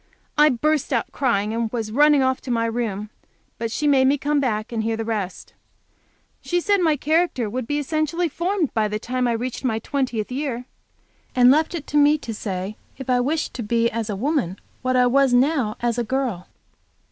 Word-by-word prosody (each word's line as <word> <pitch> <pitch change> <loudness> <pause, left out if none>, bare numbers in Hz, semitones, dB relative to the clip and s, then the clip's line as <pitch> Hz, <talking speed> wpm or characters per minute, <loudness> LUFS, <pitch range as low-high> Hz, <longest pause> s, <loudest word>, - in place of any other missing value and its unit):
I 300 0 +6
burst 300 +3 0
out 235 -4 0
crying, 220 -6 0
and 230 -1 -1
was 225 -3 -3
running 290 +2 +5
off 260 0 0
to 260 - -9
my 230 -1 +1
room, 220 -3 -3 0.5
but 230 -1 -2
she 300 - -2
made 265 -2 +4
me 280 +2 +3
come 290 +1 0
back 220 -5 -1
and 225 -2 -1
hear 225 0 -1
the 225 - -3
rest. 205 -5 -4 0.9
She 350 - 0
said 405 +3 +2
my 315 -3 +3
character 310 -4 +1
would 235 +2 -4
be 290 - -1
essentially 310 +4 0
formed 340 +1 -1
by 220 -2 +1
the 210 0 -2
time 250 +3 -1
I 235 - +1
reached 245 +3 -4
my 230 -4 0
twentieth 245 -2 -2
year, 255 -2 -3 0.7
and 250 0 +7
left 315 +4 +2
it 305 -4 -5
to 295 - -1
me 295 +1 +5
to 235 -6 -6
say 195 -1 -4 0.2
if 260 -1 -3
I 250 - +3
wished 300 +6 -1
to 250 - -5
be 230 +1 +1
as 225 -1 -3
a 205 - -2
woman 240 - -1 0.2
what 255 0 0
I 250 0 +5
was 265 0 +4
now 255 -4 +2
as 240 0 0
a - - +1
girl. 245 -7 -2
250 Hz, 205 wpm, -22 LUFS, 225-290 Hz, 0.9 s, and